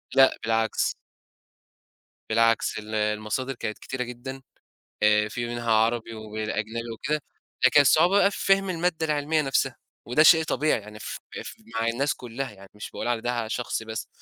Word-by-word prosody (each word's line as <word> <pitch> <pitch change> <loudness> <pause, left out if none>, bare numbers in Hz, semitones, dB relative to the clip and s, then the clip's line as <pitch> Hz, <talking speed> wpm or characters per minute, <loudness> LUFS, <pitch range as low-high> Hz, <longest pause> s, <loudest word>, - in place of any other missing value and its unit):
لأ 135 0 +6
بالعكس. 115 0 +1 1.3
بالعكس 115 0 +2
ال 110 0 -6
المصادر 110 +5 -1
كانت 110 -4 -5
كتيرة 130 -1 -4
جدًا، 125 +2 -7 0.6
آآ 105 0 +4
في 120 +2 -3
منها 120 -1 -3
عربي 115 +1 +1
والأجنبي 110 +1 -4
وكده، 150 +7 -2 0.5
لكن 145 - +6
الصعوبة 165 +7 +5
بقى 200 - +5
في - - -5
فهْم 195 0 +3
المادّة 165 -2 0
العِلمية 150 +1 +1
نَفْسها، 135 -2 0 0.3
وده 125 +6 +4
شيء 160 +1 +7
طبيعي 155 -4 +1
يعني 105 +1 -11
ف - - -6 0.3
ف - - -7 0.2
مع 115 0 0
الناس 135 +5 0
كلّها 125 +2 -5
يعني 100 -1 -15
مش 105 - -8
باقول - - -5
على 120 -2 0
ده 120 -1 -2
شخصي 120 -1 -3
بس، 110 0 -5
120 Hz, 160 wpm, -26 LUFS, 110-140 Hz, 1.3 s, شيء